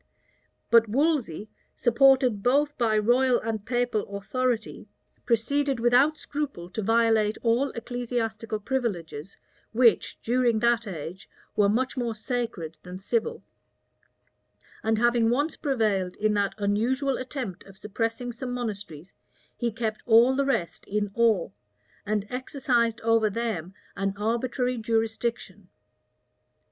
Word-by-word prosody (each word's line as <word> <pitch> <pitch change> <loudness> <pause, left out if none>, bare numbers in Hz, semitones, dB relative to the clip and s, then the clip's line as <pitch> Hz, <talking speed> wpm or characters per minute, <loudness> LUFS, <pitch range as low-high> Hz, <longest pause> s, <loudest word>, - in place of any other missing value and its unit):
But 230 -2 +6
Wolsey, 260 - 0 0.3
supported 255 -2 +4
both 290 +6 +2
by 225 -3 +1
royal 245 +3 +3
and 220 -2 -3
papal 225 -4 -1
authority, 240 +2 -2 0.4
proceeded 270 +3 +1
without 250 +6 +4
scruple 280 - -5
to 220 - -3
violate 225 -1 +2
all 240 +4 +2
ecclesiastical 230 -3 -3
privileges, 200 - -3 0.4
which, 235 0 +3
during 240 -1 +2
that 235 0 +2
age, 180 0 -7 0.3
were 205 -1 +4
much 250 +5 0
more 235 -3 -1
sacred 215 - -4
than 180 0 -8
civil; 220 +4 -2 1.4
and 220 0 +1
having 240 0 +3
once 285 +6 0
prevailed 210 -9 0
in 215 0 +1
that 200 -1 0
unusual 240 +7 0
attempt 255 -7 -5
of 195 -1 -15
suppressing 225 +4 -3
some 245 +2 -6
monasteries, 205 -8 -6 0.4
he 240 -1 -1
kept 220 -1 -3
all 235 +3 +6
the 275 +1 +1
rest 205 - -1
in 205 0 -2
awe, 225 -6 +2 0.6
and 210 -1 0
exercised 250 -3 0
over 225 -1 +3
them 200 -5 -3 0.2
an 195 0 -2
arbitrary 245 +3 -1
jurisdiction. 225 +1 -2
230 Hz, 120 wpm, -26 LUFS, 210-250 Hz, 1.4 s, But